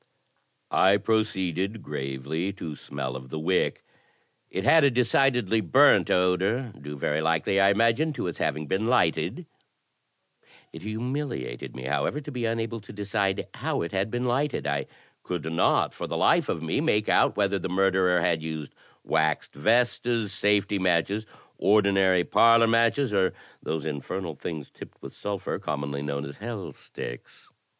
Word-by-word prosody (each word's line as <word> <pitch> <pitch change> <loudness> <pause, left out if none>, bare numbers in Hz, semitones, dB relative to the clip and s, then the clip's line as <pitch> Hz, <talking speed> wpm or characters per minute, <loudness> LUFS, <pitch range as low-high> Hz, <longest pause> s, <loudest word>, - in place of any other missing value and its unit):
I 95 +2 +5
proceeded 100 -2 -1
gravely 70 +7 -3
to 85 -5 -7
smell 65 -2 -5
of 65 -1 -8
the 80 - -5
wick. 90 +4 0 0.7
It 95 - -3
had 160 +6 +6
a 140 - +6
decidedly 125 -3 +2
burnt 85 -8 +5
odour, 95 +7 +1
due 75 +1 -7
very 75 +3 -1
likely, 80 +4 +1
I 100 0 +5
imagined, 115 +9 +2
to - - -3
its 85 - -4
having 75 +2 -1
been 95 +9 -1
lighted. 120 -10 +1 1.3
It - - -9
humiliated 110 - -4
me, 65 - -7
however, 75 - -1
to 150 0 -8
be 125 -3 -3
unable 115 0 -2
to 100 - -12
decide 100 -1 -1
how - - -2
it 85 - -5
had 95 +2 -1
been 120 +2 -2
lighted. 135 - 0
I 70 -1 -1 0.3
could 90 -4 -4
not - - +2
for - - -5
the - - -3
life - - +3
of 80 - -2
me 80 - 0
make 105 -10 +1
out - - +3
whether 100 -1 +1
the 95 - -4
mur 95 +2 +2
derer 90 -1 +2
had 80 -1 +1
used 80 -2 -6 0.3
wax 80 0 0
vestas, 115 +4 +1
safety 105 -1 +1
matches, 95 +4 +1 0.3
ordinary 95 -3 +4
parlour 115 +3 +5
matches, 115 +2 +2
or 95 -2 +2 0.3
those 80 -2 -3
infernal 80 +4 -4
things 75 0 -7
tipped - - -12
with - - -8
sulphur 100 -2 -4
commonly 70 0 -3
known 70 0 -3
as 70 - -9
"hell 105 -3 -6
sticks." - - -10
95 Hz, 160 wpm, -26 LUFS, 80-115 Hz, 1.3 s, had